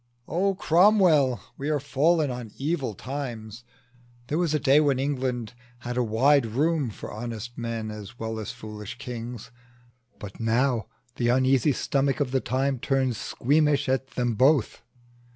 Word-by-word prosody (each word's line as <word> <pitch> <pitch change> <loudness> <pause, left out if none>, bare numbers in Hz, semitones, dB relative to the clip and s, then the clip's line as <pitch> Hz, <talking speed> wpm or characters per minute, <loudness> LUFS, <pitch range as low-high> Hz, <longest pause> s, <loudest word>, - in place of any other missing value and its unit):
"O, 195 +3 +1
Cromwell, 170 - +4 0.2
we 140 +2 -2
are 150 -1 +1
fallen 145 +2 +2
on 125 -2 -6
evil 135 - -2
times! 120 -3 -6 0.7
There 155 - 0
was 175 -4 +1
a - - +2
day 145 0 +5
when 145 -3 +2
England 130 -4 -2 0.3
had 120 +1 -4
wide 125 +3 +3
room 145 +4 0
For 105 - -8
honest 120 +1 -6
men 115 -2 -4
as 105 +3 -9
well 110 -1 -4
as 110 - -5
foolish 105 0 -8
kings; 120 -3 -7 0.7
But 100 -1 -10
now 115 +1 +1 0.3
the 120 - 0
uneasy 130 +2 +3
stomach 135 +2 0
of 140 -4 0
the 130 -1 +1
time 135 0 -1
Turns 130 -1 0
squeamish 145 +1 +1
at 130 0 0
them 120 -2 0
both. 130 +2 +2
130 Hz, 150 wpm, -26 LUFS, 115-145 Hz, 0.7 s, day